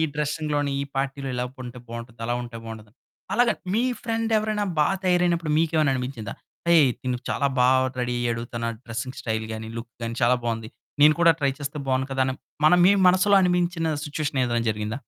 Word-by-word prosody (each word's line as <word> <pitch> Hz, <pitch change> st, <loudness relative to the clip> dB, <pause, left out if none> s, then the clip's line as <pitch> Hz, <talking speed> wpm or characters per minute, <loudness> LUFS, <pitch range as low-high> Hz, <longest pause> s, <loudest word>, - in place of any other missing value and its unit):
డ్రెసింగ్‌లోని 150 Hz, -1 st, -1 dB
ఈ -, -, -1 dB
పార్టీలో 135 Hz, 0 st, -2 dB
ఇలా 125 Hz, 0 st, -1 dB, 0.2 s
ఉంటే 125 Hz, 0 st, -8 dB
బావుంటుంది, 115 Hz, 0 st, -8 dB
అలా 120 Hz, -, 0 dB
ఉంటే 120 Hz, -1 st, -8 dB
బావుంటుంది. 110 Hz, -1 st, -9 dB, 0.4 s
అలాగ 240 Hz, +2 st, +4 dB, 0.2 s
మీ 230 Hz, +3 st, +2 dB, 0.2 s
ఫ్రెండ్ 225 Hz, 0 st, -1 dB
ఎవరైనా 215 Hz, -1 st, -1 dB, 0.2 s
బా 150 Hz, -, +4 dB, 0.2 s
తయారైనప్పుడు 175 Hz, -3 st, +2 dB
మీకేమైనా 160 Hz, -3 st, +2 dB
అని 125 Hz, -, -2 dB
పించిందా 115 Hz, -6 st, -6 dB, 0.3 s
హేయ్, 160 Hz, -6 st, +6 dB
తను 125 Hz, -1 st, -2 dB
చాలా 140 Hz, -, +1 dB
బాగా 130 Hz, +1 st, +4 dB
రెడీ 125 Hz, 0 st, -1 dB
అయ్యాడు. 115 Hz, -1 st, -1 dB
తన 115 Hz, 0 st, -3 dB, 0.2 s
డ్రెసింగ్ 115 Hz, +3 st, -5 dB
స్టైల్ 110 Hz, -1 st, -2 dB
గాని 110 Hz, 0 st, -5 dB
లుక్ 115 Hz, 0 st, -7 dB
గాని 115 Hz, 0 st, -3 dB
చాలా 125 Hz, +2 st, +4 dB
బాగుంది. 115 Hz, -1 st, -3 dB, 0.3 s
నేను 150 Hz, +1 st, +8 dB
కూడా 170 Hz, -1 st, +7 dB
ట్రై 140 Hz, -1 st, +2 dB
చేస్తే 145 Hz, +1 st, -5 dB
బాగుండు 130 Hz, +1 st, +1 dB
కదా! 135 Hz, 0 st, 0 dB
అని 130 Hz, -, -1 dB, 0.3 s
మన 155 Hz, -, +6 dB
మీ 190 Hz, -, +7 dB, 0.2 s
మనసులో 195 Hz, +3 st, +4 dB
అనిపించిన 175 Hz, -3 st, +1 dB
సిట్యుయేషన్ 145 Hz, -2 st, -2 dB
ఏదైనా 120 Hz, -1 st, -1 dB
జరిగిందా? 105 Hz, +4 st, -4 dB
135 Hz, 185 wpm, -24 LUFS, 120-165 Hz, 0.4 s, నేను